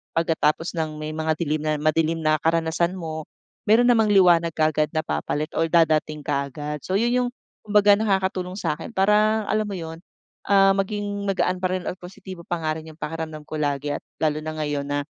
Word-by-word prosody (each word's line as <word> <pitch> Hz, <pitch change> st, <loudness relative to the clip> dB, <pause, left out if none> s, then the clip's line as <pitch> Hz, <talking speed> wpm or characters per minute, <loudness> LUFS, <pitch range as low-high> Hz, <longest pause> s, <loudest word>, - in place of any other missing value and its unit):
pagkatapos 165 Hz, 0 st, +1 dB
ng 155 Hz, -1 st, -2 dB
may 155 Hz, -, -4 dB
mga 160 Hz, 0 st, 0 dB
dilim 155 Hz, -2 st, -1 dB
na 155 Hz, -, +1 dB
madilim 160 Hz, +1 st, +1 dB
na 155 Hz, 0 st, +2 dB
karanasan 165 Hz, +1 st, +1 dB
mo, 160 Hz, -3 st, -5 dB, 0.4 s
meron 235 Hz, +3 st, +5 dB
namang 220 Hz, -3 st, +4 dB
liwanag 170 Hz, -3 st, +5 dB
kaagad 155 Hz, -1 st, +2 dB
na 155 Hz, -, +2 dB
papalit 145 Hz, -, -2 dB
or 165 Hz, -, +3 dB
dadating 155 Hz, -2 st, +2 dB
kaagad. 145 Hz, +1 st, -3 dB
So 185 Hz, -, -3 dB
yun 235 Hz, +3 st, +2 dB
yung 245 Hz, -, -1 dB, 0.4 s
kumbaga 205 Hz, -1 st, +5 dB
nakakatulong 190 Hz, -3 st, 0 dB
sa'kin 180 Hz, +3 st, -3 dB
parang 210 Hz, +2 st, +3 dB
alam 215 Hz, 0 st, +1 dB
mo 200 Hz, -, -5 dB
yun, 165 Hz, -1 st, -7 dB, 0.5 s
ah, 195 Hz, -1 st, +5 dB
maging 205 Hz, 0 st, -2 dB
magaan 185 Hz, -1 st, +1 dB
pa 185 Hz, -, +2 dB
rin 185 Hz, -1 st, -3 dB
at 180 Hz, -, -6 dB
positibo 180 Hz, 0 st, -10 dB
pa 175 Hz, -2 st, -2 dB
nga 155 Hz, 0 st, -1 dB
rin 160 Hz, -, -12 dB
yung 155 Hz, -, -24 dB
pakiramdam 160 Hz, -1 st, -5 dB
ko 155 Hz, -, -5 dB
lagi 145 Hz, 0 st, -1 dB
at -, -, -14 dB, 0.2 s
lalo 155 Hz, -1 st, +1 dB
na 155 Hz, 0 st, -4 dB
ngayon 145 Hz, -2 st, -2 dB
na, 145 Hz, 0 st, -1 dB
165 Hz, 190 wpm, -23 LUFS, 155-190 Hz, 0.5 s, meron